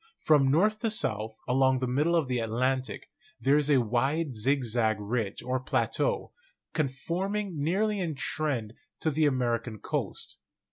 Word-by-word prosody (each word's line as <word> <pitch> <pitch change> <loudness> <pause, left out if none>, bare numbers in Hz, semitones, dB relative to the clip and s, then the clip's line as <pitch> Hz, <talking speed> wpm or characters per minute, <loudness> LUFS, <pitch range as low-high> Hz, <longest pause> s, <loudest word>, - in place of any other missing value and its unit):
From 145 -4 +4
north 210 +9 +3
to 225 - 0
south, 110 - -1
along 130 +1 +3
the 130 - -1
middle 145 +7 +1
of 160 -5 +2
the 125 -1 0
Atlantic, 130 +3 -1 0.3
there 135 +2 +3
is 150 0 +1
a 140 -3 +5
wide 135 +6 0
zigzag 115 -2 +1
ridge 105 -1 -2
or 130 +1 -1
plateau, 470 - 0 0.4
con 155 -3 +1
forming 185 +6 -3
nearly 205 +6 +1
in 165 -5 -2
trend 130 -7 -2 0.3
to 160 - +1
the 155 +1 +3
American 120 -4 -1
coast. - - -4
135 Hz, 150 wpm, -28 LUFS, 120-160 Hz, 0.4 s, a